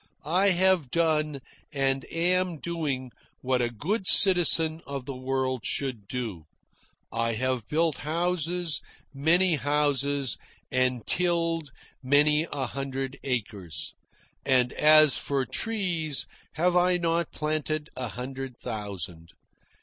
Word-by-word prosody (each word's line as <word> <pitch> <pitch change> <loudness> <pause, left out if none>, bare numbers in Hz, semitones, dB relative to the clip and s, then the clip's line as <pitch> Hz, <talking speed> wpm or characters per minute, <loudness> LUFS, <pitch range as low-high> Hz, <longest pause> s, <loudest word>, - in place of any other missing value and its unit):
I 185 +6 +3
have 185 -5 +3
done, 155 -2 0 0.3
and 135 -2 -1
am 180 +1 +1
doing, 145 -7 -3 0.3
what 130 -1 0
a 120 - 0
good 185 - -3
citizen 165 -4 +6
of 140 -2 -5
the 140 - -6
world 130 -1 -2
should 125 -8 -2
do. 110 -11 -5 0.7
I 115 0 -1
have 125 -1 -2
built 160 0 0
houses, 170 +1 -1 0.3
many 165 +4 +3
houses, 145 -2 0 0.3
and 130 -2 0
tilled 165 -3 0 0.3
many 150 +4 +3
a 140 -2 -2
hundred 135 +1 -5
acres. 100 - -4 0.5
And 130 -2 +2
as 155 -2 +7
for 140 -2 -1
trees, 175 - 0 0.3
have 175 +4 +1
I 180 0 +3
not 170 -1 -1
planted 155 0 -3
a 130 -1 -4
hundred 130 +1 -7
thousand? 90 -6 -6
145 Hz, 115 wpm, -27 LUFS, 130-165 Hz, 0.7 s, as